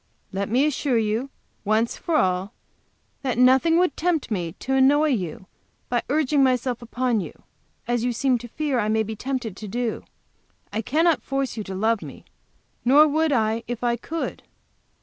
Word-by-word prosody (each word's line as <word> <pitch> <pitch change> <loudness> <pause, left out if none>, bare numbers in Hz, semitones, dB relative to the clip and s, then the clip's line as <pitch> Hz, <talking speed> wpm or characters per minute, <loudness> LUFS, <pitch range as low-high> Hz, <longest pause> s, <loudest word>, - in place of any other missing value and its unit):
Let 200 +1 -3
me 255 +6 +3
assure 285 -4 0
you, 225 +4 0 0.3
once 220 +3 +1
for 335 - -2
all, 185 -2 +1 0.7
that 255 -4 -2
nothing 265 +7 +5
would 355 -5 +2
tempt 325 -7 -1
me 175 -5 -2
to 265 +7 -4
annoy 285 +3 +4
you 190 - -2 0.4
by 240 -1 +1
urging 290 -1 +2
myself 250 -2 +1
upon 240 0 -1
you, - - -10 0.4
as 240 -1 0
you 245 - +1
seem 250 +1 +1
to 240 - -9
fear 285 +1 -1
I 210 - 0
may 220 0 +2
be 220 +1 -5
tempted 250 -3 -4
to 215 - -8
do. 235 +2 -3 0.7
I 220 - -1
cannot 320 +7 +2
force 270 -1 -2
you 215 - -4
to 190 - -6
love 220 +2 +1
me, - - -10 0.6
nor 285 +5 +6
would 315 +1 +1
I 225 -2 +1
if 240 0 -5
I 240 -1 +2
could. 320 +8 -5
245 Hz, 175 wpm, -24 LUFS, 220-275 Hz, 0.7 s, nor